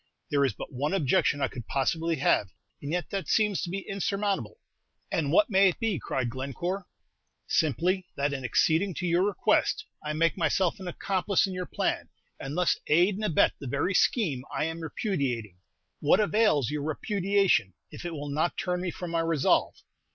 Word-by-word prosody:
"There 140 -1 +3
is 135 - +1
but - - -9
one 145 +8 -1
objection 145 -3 +2
I 135 - +2
could 120 -5 -9
possibly 165 +5 0
have, 120 -8 +2 0.3
and 145 - -5
yet 175 -1 -2
that 195 -1 -3
seems 210 -3 +2
to - - -3
be 195 +2 -5
insurmountable." 195 - -2 0.5
"And 145 -3 0
what 290 - +4
may 195 0 +6
it - - -5
be?" 225 - 0
cried 130 +1 -2
Glencore. 170 +9 -4 0.6
"Simply, 180 - +1
that 140 +1 0
in 135 -2 -4
acceding 160 - +2
to 180 - -3
your 175 +1 +2
request, 205 - +1 0.2
I 150 0 -2
make 165 +2 +2
myself 185 +2 +1
an 190 - -7
accomplice 190 +2 +1
in 190 - -5
your 180 0 -4
plan, - - -2 0.3
and 140 +4 -5
thus 180 -1 +2
aid 175 +6 +4
and 210 +3 -5
abet 165 -8 +3
the 140 - -7
very 140 +9 0
scheme 165 - +2
I 140 0 -1
am 165 +1 -4
repudiating." 135 - -2 0.4
"What 150 - +4
avails 210 - +2
your 150 -1 -2
repudiation 190 - +1 0.2
if - - -9
it 175 -1 -4
will 145 -1 -5
not 155 +4 0
turn 180 -1 -1
me 185 - -2
from 175 0 -6
my 165 - +1
resolve? 165 -4 +2
170 Hz, 185 wpm, -28 LUFS, 140-195 Hz, 0.6 s, may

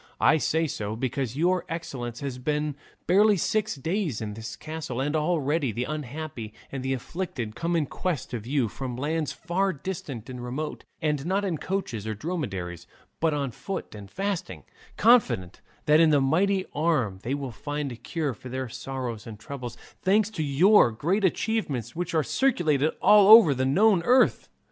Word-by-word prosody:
I - - +5
say 160 +2 +1
so, 110 -7 -3
because 130 +1 -2
your 180 +3 +2
excellence 130 -8 -5
has 135 -3 -4
been 150 +2 -1 0.3
barely 205 +3 +5
six 215 +4 0
days 160 - -2
in 105 -2 -4
this 110 +1 -7
castle, 155 -5 -5
and 145 +3 0
already 155 -3 +1
the 120 +4 -2
unhappy 145 -5 -6 0.2
and 135 - -4
the 130 +1 -1
afflicted 130 - -5
come 170 +1 -1
in 160 -3 +2
quest 170 0 -3
of 115 -2 -5
you 135 -3 +1
from 125 +2 -5
lands 155 +3 -1
far 190 +4 -1
distant 140 - -6
and 125 -1 -7
remote, 140 +5 -5 0.2
and 150 -3 0
not 195 +2 +1
in 170 -6 -2
coaches 125 - -3
or 110 - -1
on - - -11
dromedaries, 95 - -4 0.3
but 160 -2 +2
on 140 -3 -2
foot 195 - -6
and 100 -2 -10
fasting, 180 - -3 0.3
confident 130 - +3 0.2
that 150 +1 +5
in 165 -1 +6
that 145 -2 +4
mighty 185 +8 +2
arm 145 - 0
they 130 +6 -2
will 140 -3 -5
find 145 +4 -4
a - - -6
cure 150 +3 -3
for 125 +3 -11
their 130 +1 -3
sorrows 125 -3 -5
and 110 -2 -8
troubles; 125 -2 -7 0.3
thanks 205 +2 +3
to 185 - -4
your 150 - +5
great 175 - 0
achievements, 165 - -1
which 175 0 -3
are 155 - +3
circulated 160 - +2
all 210 -2 +7
over 215 -8 +9
the 130 0 0
known 195 +5 +4
earth." 250 +8 +3
150 Hz, 175 wpm, -26 LUFS, 125-175 Hz, 0.3 s, over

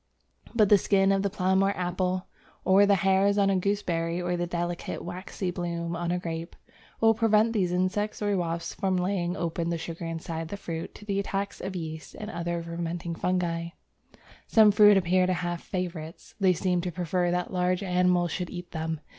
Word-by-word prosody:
But 215 -4 +4
the 205 - +7
skin 195 0 +3
of 195 0 +2
the 200 - 0
plum 190 -1 +1
or 195 +1 +1
apple, 180 +1 -1 0.4
or 195 +2 +6
the 200 - +5
hairs 195 +2 +3
on 195 -1 +4
a - - +2
gooseberry, 180 -3 0
or 180 0 -1
the 175 0 -2
delicate, 175 0 -3
waxy 180 +1 -4
bloom 170 -1 -3
on 170 0 -2
a 180 - +1
grape, 165 -1 -5 0.4
will 225 0 +5
prevent 225 0 +3
these 185 -5 +1
insects 185 +4 0
or 205 -1 0
wasps 170 -2 -2
from 190 -2 0
laying 180 -1 -1
open 170 0 -2
the 170 - -1
sugar 165 +1 -6
inside 165 0 -4
the 200 - -6
fruit 165 -4 -6
to 210 - -12
the 200 -1 -1
attacks 200 0 -3
of 190 0 -5
yeasts 160 -2 -6
and 215 +1 -6
other 170 -2 -3
fermenting 170 0 -4
fungi. 170 -1 -1 0.8
Some 215 -2 +6
fruits 205 0 +7
appear 185 0 +3
to 185 - +2
have 175 -1 -3
"favourites"; 170 -3 -5
they 190 -2 +4
seem 180 0 0
to 180 0 -3
prefer 175 +1 0
that 180 +1 -1
large 180 +1 +1
animals 180 -2 +2
should 180 0 -3
eat 175 -1 -8
them. 160 -1 -3
180 Hz, 190 wpm, -27 LUFS, 170-195 Hz, 0.8 s, the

